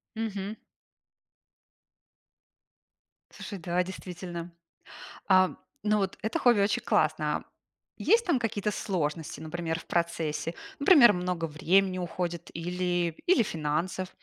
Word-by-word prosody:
Мгм. 215 -1 -3 2.8
Слушай, 200 - -7
да, 175 +1 0
действительно. 175 -2 -7 0.8
А, 185 -1 +6
м, - - -10 0.2
ну 210 0 +2
вот 195 -1 -2
это 220 - -1
хобби 240 -4 +4
очень 200 +1 +1
классное. - - +1 0.5
Есть 465 +1 +3
там 340 -8 +3
какие-то 210 -3 -1
сложности, 160 -6 -3
например, 160 0 -3
в - - -15
процессе? 170 -1 -1 0.2
Например, 280 - +8
много 180 -2 -2
времени 185 +5 +2
уходит 175 -1 -4
или 175 0 -1
или 345 -10 +5
финансов, 165 +3 -2
180 Hz, 110 wpm, -28 LUFS, 170-205 Hz, 2.8 s, Например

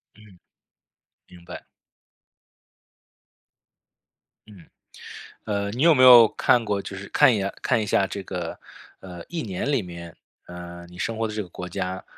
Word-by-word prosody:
嗯， 105 -2 -18 0.9
明 90 -1 -17
白。 - - -10 2.8
嗯， 100 -6 -16 0.8
呃， 100 -1 -2
你 125 +5 -3
有 165 0 +6
没 130 - +3
有 120 -3 +9
看 120 +2 +1
过， 100 -2 -2
就 95 - -8
是 100 +1 -9
看 125 - +4
一 - - -1
眼 100 0 -3
看 120 -3 +1
一 105 - -4
下 100 -1 +1
这 100 - -6
个， 90 -3 -6 0.4
呃， 90 -2 -10
1 170 -1 -4
年 100 +5 -4
里 135 -6 +1
面， 85 -2 -10 0.3
呃， 85 0 -10
你 90 - -15
生 115 +3 -3
活 115 0 -1
的 105 - -6
这 105 - -3
个 90 - -12
国 90 +1 -8
家， 95 0 -5
100 Hz, 170 characters per minute, -23 LUFS, 90-110 Hz, 2.8 s, 有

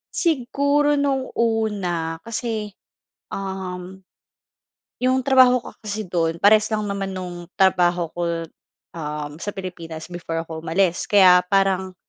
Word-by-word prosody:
Siguro 290 -1 +2
nung 275 -2 0
una 195 -8 -1
kasi, 225 -2 -4 0.6
um, 190 -1 -6 1.0
yung 255 +1 +2
trabaho 255 -2 +5
ko - - -9
kasi 215 0 -4
dun 170 -3 -1
parehas 215 +1 +6
lang 215 -1 -1
naman 200 -2 -3
nung 175 -2 -6
trabaho 175 -3 +2
ko, 170 -1 -2 0.5
um, 150 -1 -6
sa 205 - -4
Pilipinas 170 -4 -7
before 165 -2 -4
ako 160 -1 -8
umalis 175 +1 +1
kaya 180 -3 +6
parang, 190 -1 +1
190 Hz, 120 wpm, -22 LUFS, 175-220 Hz, 1.0 s, parehas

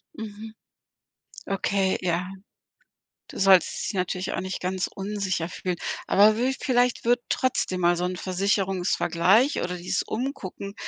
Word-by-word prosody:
Mhm, 220 0 -8 0.9
okay, 195 0 0
ja. 180 0 -1 1.0
Du - - -8
solltest 190 -2 +4
dich - - -6
natürlich 185 0 -2
auch - - -1
nicht 190 0 -4
ganz 185 0 -1
unsicher 195 -4 -3
fühlen, 180 0 -3 0.3
aber 210 +2 +5
wü 250 +3 +1
vielleicht 245 -2 +1
wird 240 +1 +3
trotzdem 190 -7 0
mal 175 0 +3
so 175 - -2
'n 180 0 -2
Versicherungsvergleich 195 +4 +1
oder 180 0 -3
dieses 175 +1 -2
umgucken 215 -5 -5
195 Hz, 130 wpm, -25 LUFS, 180-215 Hz, 1.0 s, aber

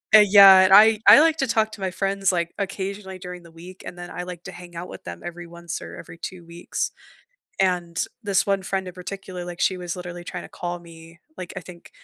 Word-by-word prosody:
uh, - - +11
yeah, 195 -1 +9
and, 190 - +4
I 215 +1 +7
I - - +10
like 320 0 +4
to 270 - +1
talk 220 -1 +1
to 200 - -10
my 190 - -2
friends, 195 +1 0
like, 170 -1 -2
occasionally 195 -1 -5
during 180 -1 -9
the 170 - -16
week, 175 +3 -13
and - - -8
then 175 0 -8
I, 180 - -6
like, 180 -1 -9
to - - -7
hang 175 -1 -12
out 170 +2 -7
with - - -10
them 85 0 -8
every 175 0 -7
once 170 0 -7
or - - -10
every 165 - -11
2 180 0 -8
weeks, 170 +1 -4 0.7
and 175 -3 0 0.2
this 200 -3 +1
1 195 -1 0
friend 190 -1 -2
in 180 - -8
particular, 185 -1 -7
like, 175 0 -8
she 185 -1 +1
was 175 -1 -5
literally 175 -1 -8
tryna - - -7
call 175 0 -5
me 165 0 -15 0.2
like, 180 - -7
I - - -4
think 175 -1 -14
180 Hz, 235 wpm, -23 LUFS, 175-195 Hz, 0.7 s, uh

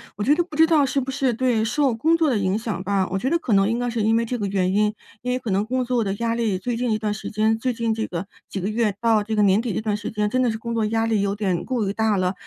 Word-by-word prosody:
我 205 - -3
觉 285 - +4
得 345 - +2
不 320 -3 -11
知 320 +1 +6
道 320 -3 +4
是 275 +1 0
不 265 +1 -3
是 265 -1 +1
对， 235 -2 +1
受 265 +3 +1
工 320 +9 +2
作 325 -1 +2
的 240 -7 +1
影 190 +1 0
响 220 -5 -4
吧。 195 -1 0
我 190 - -1
觉 260 - -1
得 335 - +2
可 255 -9 -2
能 195 +1 +4
应 230 - 0
该 245 0 -1
是 230 -1 -1
因 220 +1 +3
为 230 0 +1
这 245 0 -3
个 200 - -1
原 190 -1 0
因， 210 +1 +2 0.3
因 250 - -2
为 250 - +1
可 235 -4 -4
能 195 +2 +2
工 255 +3 -1
作 245 -1 +1
的 195 -1 -2
压 230 +2 -1
力 225 -5 0
最 235 +6 -3
近 245 +1 -1
一 215 - +2
段 210 -1 -2
时 215 - -6
间， 220 +1 +1
最 255 +2 0
近 230 -1 -1
这 220 0 -3
个， 175 +1 -4 0.2
几 195 - -4
个 190 - -2
月 215 -1 0
到 225 -2 +3
这 220 +1 -3
个 210 - +3
年 200 +1 +4
底 230 -3 -3
这 - - 0
段 215 -1 -1
时 210 0 -5
间 210 -1 -1
真 255 +4 0
的 250 - +2
是 220 - -4
工 235 +1 -5
作 225 -2 +1
压 225 +1 0
力 220 -3 +1
有 200 0 0
点 190 -4 -1
过 240 -6 -1
于 195 - -1
大 220 -2 +1
了， 185 0 0
220 Hz, 360 characters per minute, -23 LUFS, 205-245 Hz, 0.3 s, 知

